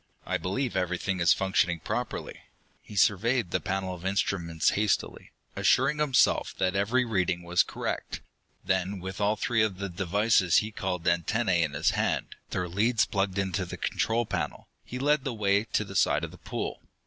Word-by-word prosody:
I - - 0
believe 115 +7 -2
everything 90 +1 -1
is 85 0 +4
functioning 95 -3 +2
properly." - - -4 0.4
He 105 - -12
surveyed 105 +1 +2
the - - +1
panel 95 -1 -2
of 90 -1 -10
instruments 90 -4 0
hastily, 105 0 -1 0.3
assuring 150 - +3
himself 145 -4 +2
that 95 0 0
every 115 +6 +2
reading 90 -6 0
was 85 0 +3
correct. - - -4 0.5
Then, 95 +1 0
with 95 +2 -6
all 105 +1 +2
three 115 +1 +1
of 105 -4 0
the 100 0 -4
devices 95 0 +2
he 110 +1 +1
called 90 -4 -3
antennae 95 +1 +2
in 75 -3 0
his 75 +2 +2
hand, - - -1 0.2
their 90 -1 -2
leads 110 +6 +2
plugged 95 -1 -1
into 95 -1 -1
the 90 - -7
control 115 +1 0
panel, - - -4 0.2
he 125 - -7
led 145 +1 +2
the 135 -4 -3
way 100 0 +2
to 105 -2 -1
the 95 - -10
side - - +3
of - - -4
the - - -14
pool. - - -5
95 Hz, 175 wpm, -28 LUFS, 90-110 Hz, 0.5 s, is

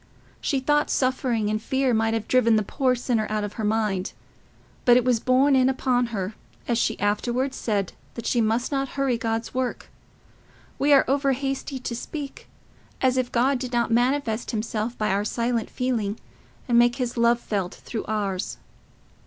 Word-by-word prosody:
She 275 - 0
thought 295 +3 +2
suffering 255 -4 +1
and 215 0 -1
fear 265 +1 +1
might 225 0 +2
have 225 - -3
driven 240 -3 +4
the 215 - +2
poor 255 +4 +1
sinner 235 -3 0
out 215 -1 -1
of 205 0 -4
her 220 - -5
mind. 210 -3 0 0.7
But 245 -1 +6
it 250 - +2
was 245 -3 +3
borne 260 +4 +3
in 260 0 +4
upon 250 -2 +1
her, 205 -3 -3 0.3
as 235 -1 +1
she 225 - 0
afterwards 240 +6 0
said, 200 -4 -1 0.2
that 235 - -6
she 240 - +2
must 225 +4 0
not 275 -1 -1
hurry 270 -3 +2
God's 225 0 -2
work: 255 -1 -3 0.9
we 290 +1 +3
are 275 -2 +7
overhasty 275 0 0
to 235 - -3
speak—as 270 -1 -5
if 255 -1 0
God 255 +2 +2
did 250 -1 -5
not 235 -1 +1
manifest 240 -1 +1
himself 225 +1 -2
by 215 - 0
our 200 +1 +1
silent 235 +1 -1
feeling, 230 -5 -2 0.5
and 235 -2 +4
make 240 0 +4
his 250 -3 -3
love 235 0 +3
felt 195 -5 -3
through 225 - -6
ours. 200 -3 -2
240 Hz, 170 wpm, -25 LUFS, 220-260 Hz, 0.9 s, are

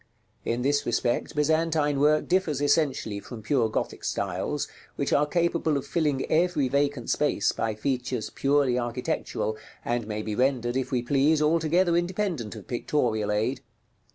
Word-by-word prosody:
In 120 +1 -1
this 145 +1 +2
respect 120 +2 -1
Byzantine 155 -1 +1
work 150 +2 +3
differs 175 -6 +1
essentially 145 -8 +1
from 110 +1 -9
pure 125 -5 +2
Gothic - - -3
styles, 100 +9 -2 0.3
which 140 - -1
are 145 +1 +3
capable 170 -2 +1
of 140 - -4
filling 145 -2 0
every 160 -4 +2
vacant 140 -2 0
space 145 -8 +1
by 110 -1 -2
features 125 0 -2
purely 135 -3 +2
architectural, 120 -2 -2 0.3
and 120 -2 -1
may 105 0 -3
be 110 - -3
rendered, 125 0 +1
if 130 -1 -1
we 125 -2 0
please, 140 +4 +3
altogether 165 +3 +2
independent 175 - -1
of - - -10
pictorial 120 -4 0
aid. 120 +5 0
140 Hz, 150 wpm, -26 LUFS, 120-155 Hz, 0.3 s, work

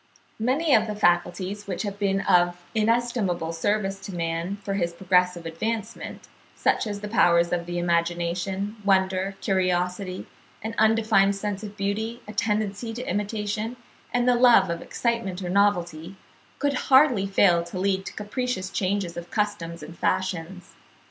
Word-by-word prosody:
Many 270 +7 +2
of 220 -1 +4
the 210 - -3
faculties, 185 +2 0
which 190 +2 -3
have 200 -1 -5
been 195 -1 +1
of 175 -2 +3
inestimable 220 -7 0
service 195 +3 -1
to 195 -1 -8
man 165 +2 -2
for 195 - -2
his 170 -3 -1
progressive 180 -1 +1
advancement, 215 +7 -4 0.3
such - - +1
as 205 -1 -4
the 210 - -4
powers 170 -5 +3
of 175 -1 -1
the 175 0 -3
imagination, 175 +4 -1
wonder, 190 0 +1
curiosity, 185 0 -1 0.4
an 220 +1 -3
undefined 220 -3 +4
sense 200 0 -3
of 210 -1 -8
beauty, 220 +4 -2
a 210 - -7
tendency 210 +1 -1
to 245 +2 -6
imitation, 210 +3 -2 0.3
and 245 0 +1
the 250 - +6
love 240 -7 +5
of 170 - -4
excitement 230 -6 -2
or 175 - -3
novelty, 180 -3 +1 0.4
could 285 -1 0 0.2
hardly 260 -7 +5
fail 180 -3 +4
to 185 - -7
lead 190 0 0
to - - -6
capricious 210 -2 -3
changes 190 -3 -1
of 170 0 -7
customs 170 -6 -2
and 165 +3 -11
fashions. 180 -1 -2
195 Hz, 150 wpm, -25 LUFS, 175-215 Hz, 0.4 s, the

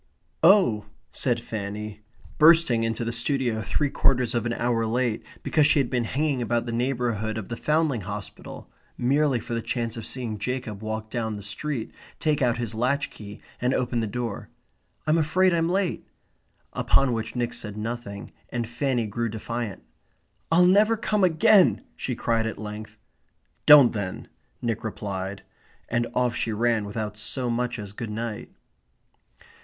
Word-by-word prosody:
"Oh," 165 - +5 0.2
said - - +1
Fanny, 105 0 -5 0.4
bursting 160 -7 +6
into 115 +1 -1
the 115 - -1
studio 120 -1 0
three 145 +5 0
quarters 125 -3 +2
of 120 -1 0
an 120 - -1
hour 115 -1 0
late 120 -1 0 0.2
because 150 -2 +3
she 155 - +3
had 135 -4 +1
been 120 -2 +1
hanging 140 +1 0
about 120 0 0
the 120 - -3
neighbourhood 115 -3 -1
of 110 - -6
the 115 - -3
Foundling 150 -6 +1
Hospital 100 +2 -8 0.3
merely 135 +1 +2
for 115 - -6
the 115 - -1
chance 115 -1 -3
of 115 -1 -5
seeing 115 -5 -4
Jacob 120 -3 -3
walk 110 0 -4
down 110 -2 -2
the 100 -1 -7
street, 115 +4 -4 0.3
take 150 -2 +1
out 120 -3 +2
his 120 -2 -2
latch 130 +6 0
key, 105 -1 -10 0.2
and 125 +2 +2
open 120 -1 0
the 110 - -1
door, 115 -1 -4 0.6
"I'm 155 +2 +3
afraid 180 +4 +3
I'm 165 0 +2
late"; 190 -1 0 0.7
upon 135 -3 +3
which 115 +1 -4
Nick 120 -1 -1
said 105 -1 -5
nothing 110 -2 -5 0.2
and 120 -1 -2
Fanny 120 0 -1
grew 115 +2 -2
defiant. 110 - -4 0.7
"I'll 175 +2 +6
never 210 +5 +5
come 215 -2 0
again!" 190 +3 +5
she 125 - -3
cried 115 -1 0
at 110 - -4
length. 105 +1 -7 0.7
"Don't, 145 -5 +9
then," 100 -4 -4 0.3
Nick 115 -2 -1
replied, 100 -3 -4 0.5
and 120 0 +1
off 125 -1 +1
she 115 - -1
ran 115 0 +1
without 105 0 -4
so 125 +3 -1
much 125 +1 -1
as 105 -2 -7
good 115 +1 -5
night. 110 0 -4
120 Hz, 160 wpm, -25 LUFS, 110-135 Hz, 0.7 s, Don't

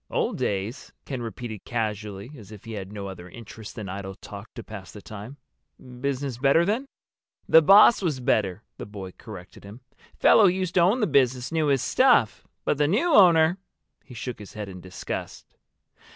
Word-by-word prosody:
"Old - - -1
days?" 100 +5 -3
Ken 130 -3 -5
repeated 115 -1 -7
casually, 105 -1 -4
as 110 -6 -13
if 105 -2 -12
he 115 - -8
had 100 -3 -6
no 100 -1 -6
other 90 -2 -9
interest 110 +1 -11
than 105 -3 -6
idle 95 0 -6
talk - - -11
to - - -7
pass - - -10
the - - -10
time. 110 +6 -10 0.6
"Business 135 -2 -3
better 140 +5 +4
then?" 230 +8 -1 0.6
"The 160 - +7
boss 200 +8 +7
was 155 -8 -1
better," 110 -6 0 0.2
the - - -7
boy 100 -3 -8
corrected 95 -3 -12
him. 105 +5 -12 0.3
"Fellow 215 - +6
who 180 - +4
used 185 -2 -3
to - - +3
own 200 +9 +3
the - - +3
business 130 - +1
knew 160 -2 +1
his 135 -2 +2
stuff. 250 - +3 0.2
But 145 - 0
the 145 - +3
new 270 - +1
owner—!" 175 -3 +6 0.4
He 125 - -13
shook 120 +1 -6
his 105 - -11
head 105 -1 -6
in 90 -1 -10
disgust. 90 +1 -7
120 Hz, 185 wpm, -25 LUFS, 105-160 Hz, 0.6 s, The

